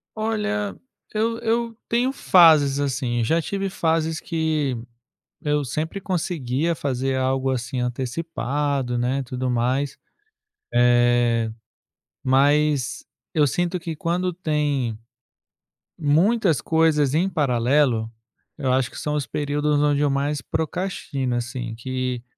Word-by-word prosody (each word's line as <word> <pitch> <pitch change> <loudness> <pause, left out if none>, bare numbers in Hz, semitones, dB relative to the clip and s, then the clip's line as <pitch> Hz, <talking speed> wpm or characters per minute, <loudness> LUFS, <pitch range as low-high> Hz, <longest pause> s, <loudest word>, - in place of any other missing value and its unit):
Olha, 210 -2 -1 0.4
eu 225 +2 0
eu 230 0 -1
tenho 245 +3 +1
fases 155 - +5
assim. 130 -4 -1
Já 165 +8 +2
tive 195 +3 -2
fases 160 -2 0
que 155 -6 -1 0.7
eu 150 -1 0
sempre 155 +8 -3
conseguia 165 -4 -1
fazer 135 -1 -1
algo, 130 0 +1
assim, 125 0 -3
antecipado, 135 0 -2
né, 130 +3 0
tudo 125 +1 -3
mais. 130 +4 0 0.8
Eh, 120 -1 +3 0.7
mas 145 +1 +2 0.3
eu 150 -2 +4
sinto 175 +5 -1
que 165 -2 -5
quando 175 +3 -1
tem 145 - -1 1.0
muitas 165 - +2
coisas 155 -4 +2
em 175 +5 +2
paralelo, 125 -5 +2 0.5
eu 135 -3 0
acho 130 -2 +1
que - - -11
são 150 0 -2
os 145 -3 -1
períodos 145 +2 0
onde 145 -1 +2
eu 145 - +3
mais 140 +1 -1
procrastino, 160 -6 -2
assim, 120 -1 -4
que 125 0 -3
145 Hz, 115 wpm, -23 LUFS, 130-165 Hz, 1.0 s, fases